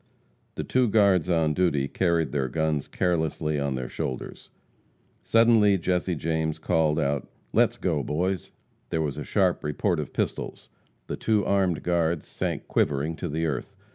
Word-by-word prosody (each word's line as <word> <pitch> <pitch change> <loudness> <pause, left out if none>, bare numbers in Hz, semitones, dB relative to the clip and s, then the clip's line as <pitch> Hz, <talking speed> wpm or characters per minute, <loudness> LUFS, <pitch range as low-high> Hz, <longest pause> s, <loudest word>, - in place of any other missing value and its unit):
The - - -3
two 125 -1 +2
guards 100 -5 +3
on 80 -3 +2
duty 75 -6 +1
carried 85 0 +1
their 70 -3 0
guns 80 0 -1
carelessly 80 -4 0
on 70 -1 -1
their 65 -1 -3
shoulders. 65 - -5 0.7
Suddenly, 115 -3 +4
Jesse 90 0 0
James 80 0 -1
called 80 -2 +1
out, 70 -1 -1 0.2
"Let's - - +3
go, - - 0
boys!" 90 +5 -2 0.4
There 80 - 0
was 70 -3 -3
a - - -4
sharp - - +1
report 85 +4 0
of 75 - -4
pistols. - - -3 0.4
The - - -5
two 110 -2 +1
armed 95 -5 +1
guards 85 -2 0
sank - - -3
quivering 75 +3 0
to 90 - -4
the 80 +3 -1
earth. 70 -6 -3
80 Hz, 155 wpm, -26 LUFS, 75-90 Hz, 0.7 s, Suddenly